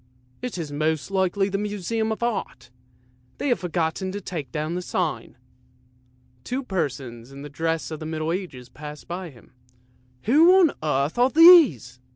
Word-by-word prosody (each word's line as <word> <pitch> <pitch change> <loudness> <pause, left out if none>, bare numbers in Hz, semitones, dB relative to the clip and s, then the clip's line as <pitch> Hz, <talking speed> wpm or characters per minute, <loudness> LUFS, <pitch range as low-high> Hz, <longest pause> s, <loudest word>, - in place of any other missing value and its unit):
" 125 0 -35
It 250 -5 -5
is 160 -4 -5
most 155 +3 -1
likely 195 0 +1
a 195 - -1
Museum 210 +2 -2
of 220 - -3
Art, 160 - -4
and 125 0 -36
they 285 - -2
have 245 - +1
forgotten 175 +1 -2
to 205 - -4
take 160 -9 -6
down 155 +4 -3
the 180 - -3
sign." 175 -2 -3 1.1
Two 260 +2 -3
persons 135 - -4
in 140 +1 -10
the 145 - -8
dress 165 +2 -2
of 155 - -5
the 155 - -6
Middle 160 0 -3
Ages 170 -9 -5
passed 150 +2 -10
him. 170 -10 -8 0.3
" 125 0 -36
Who 330 - +6
on 335 -6 +5
earth 150 - -1
are 250 +2 +5
these? 290 - +6
160 Hz, 175 wpm, -24 LUFS, 135-205 Hz, 1.1 s, Who